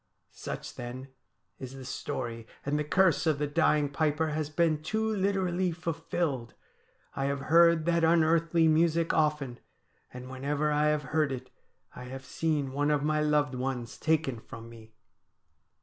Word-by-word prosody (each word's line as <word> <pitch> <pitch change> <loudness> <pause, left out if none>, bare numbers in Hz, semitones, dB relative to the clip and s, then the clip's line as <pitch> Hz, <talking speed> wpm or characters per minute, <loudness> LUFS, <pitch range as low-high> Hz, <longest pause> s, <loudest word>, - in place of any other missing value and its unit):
' - - -45 0.2
Such, - - -5
then, 125 +2 -7 0.5
is 130 0 -8
the 135 -1 -9
story; 120 -2 -5 0.2
and 145 +2 0
the - - 0
curse 170 +1 +2
of 155 -3 +2
the 150 - 0
dying 150 -1 +2
piper 155 +2 0
has 150 -1 -2
been 155 -1 +1
too 220 +7 -1
literally 190 -3 0
fulfilled. 165 -6 -3 0.6
I 135 - -1
have 140 0 -1
heard 170 +2 +5
that 170 -1 +2
unearthly 165 0 +3
music 165 +1 +2
often, 150 -5 0 0.5
and 125 0 -9
whenever 140 +3 -1
I 150 0 +2
have 150 0 +1
heard 155 -3 +2
it 130 -1 -6 0.4
I - - -8
have 130 +1 -8
seen 150 -4 -1
one 145 +1 +1
of 145 -1 +1
my 155 0 +1
loved 150 -2 +2
ones 125 -2 -3
taken 155 -6 0
from 115 +1 -11
me.' 110 -1 -15
150 Hz, 160 wpm, -29 LUFS, 135-165 Hz, 0.6 s, heard